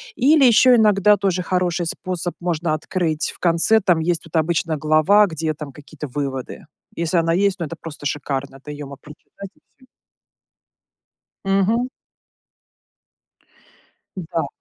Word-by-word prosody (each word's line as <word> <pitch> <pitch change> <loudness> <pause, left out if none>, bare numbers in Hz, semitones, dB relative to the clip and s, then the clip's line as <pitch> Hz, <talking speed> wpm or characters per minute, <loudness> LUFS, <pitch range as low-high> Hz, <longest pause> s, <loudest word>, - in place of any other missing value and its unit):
или, 285 +1 +4
ещё 245 +1 +6
иногда 210 -2 +4
тоже 190 -2 0
хороший 180 -1 -1
способ- 180 0 -4
можно 170 -2 -1
открыть 160 0 -2
в - - -19
конце, 170 +6 +3
там, 180 -4 +2
есть 170 0 0
тут 165 - -12
обычно 160 0 0
глава, 155 +8 +4
где, 160 -4 -3
там, 150 -2 -8
какие-то 150 +1 -9
выводы. 135 -1 -5 0.3
Если 170 +1 -1
она 165 0 +2
есть, 195 +1 +1
ну 170 - -2
это 165 - -7
просто 155 -3 -10
шикарно. 140 -2 -3
Это 140 +2 -13
её 145 0 -7
мо 140 0 -9
прочитать 155 +7 -13
и - - -29 0.3
всё. - - -37 1.6
Мгм. 200 +6 +1 2.3
М-да. 165 -3 -3
170 Hz, 140 wpm, -21 LUFS, 155-190 Hz, 2.3 s, ещё